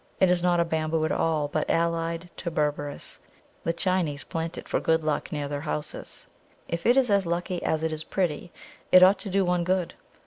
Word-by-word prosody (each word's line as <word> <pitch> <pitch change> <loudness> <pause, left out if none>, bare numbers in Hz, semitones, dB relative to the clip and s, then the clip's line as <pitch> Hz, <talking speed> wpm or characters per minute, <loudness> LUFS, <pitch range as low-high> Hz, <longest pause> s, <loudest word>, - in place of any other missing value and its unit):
It 185 -1 +5
is 180 -1 +2
not 175 -1 +3
a 170 - +3
Bamboo 160 -1 0
at - - -1
all, 155 -3 +1
but 150 +1 -2
allied 165 +1 0
to 175 - -3
Berberis; 145 -2 -2 0.4
the 165 - +1
Chinese 170 -4 -1
plant 165 0 -4
it - - -8
for - - 0
good 160 0 +1
luck 155 -1 -1
near 145 -2 -2
their 145 0 -4
houses. 150 0 -5 0.4
If 170 +3 -2
it 245 +2 +5
is 255 -5 +3
as 200 -3 +3
lucky 175 +1 -2
as 160 0 0
it 160 -1 0
is 155 0 -4
pretty, 175 -2 -2 0.4
it 185 0 +9
ought 190 +1 +6
to 200 - -6
do 195 0 +2
one 180 -1 +1
good! 180 0 0
165 Hz, 210 wpm, -26 LUFS, 155-180 Hz, 0.4 s, it